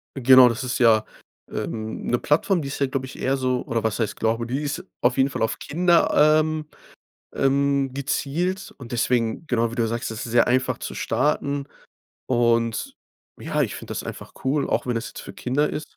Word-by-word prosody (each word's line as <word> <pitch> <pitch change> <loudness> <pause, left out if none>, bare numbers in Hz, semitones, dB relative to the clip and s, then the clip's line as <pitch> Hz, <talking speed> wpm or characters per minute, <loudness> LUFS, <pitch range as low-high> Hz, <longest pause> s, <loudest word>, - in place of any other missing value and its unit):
Genau, 130 -1 +7
das 115 +3 -3
ist 125 0 -2
ja, 110 -3 +5 0.5
ähm, 110 0 -4
'ne 120 - +2
Plattform, 165 +4 +1
die 140 - -5
ist 140 - -5
ja, 140 - +2
glaube 130 0 -3
ich, 130 - -11
eher 135 +1 +1
so 130 -1 0
oder 115 -1 -2
was 110 0 -1
heißt 110 -3 -1
glaube, 115 +1 0
die 130 +4 -2
ist 150 +4 -3 0.2
auf 125 +2 +2
jeden 135 +1 +3
Fall - - -5
auf 110 - 0
Kinder, 170 +2 +2 0.3
ähm, 155 0 -3 0.7
ähm, 140 0 +1
gezielt 155 +7 -2
und 125 -3 -11
deswegen 120 +3 0
genau, 115 -3 +1
wie - - -7
du 120 - +1
ja - - 0
sagst, 115 +1 -3
das 110 +1 -5
ist 115 - -7
sehr 120 0 +4
einfach 130 +1 +1
zu - - -6
starten. 140 0 -1 0.6
Und 115 -2 +1 0.5
ja, - - 0
ich - - -2
finde - - -8
das - - -4
einfach - - -8
cool, 140 +2 +1
auch - - 0
wenn 125 - 0
das 115 - -3
jetzt - - -9
für - - -9
Kinder 125 +10 0
ist. 155 0 -7
130 Hz, 205 wpm, -23 LUFS, 115-140 Hz, 0.7 s, Genau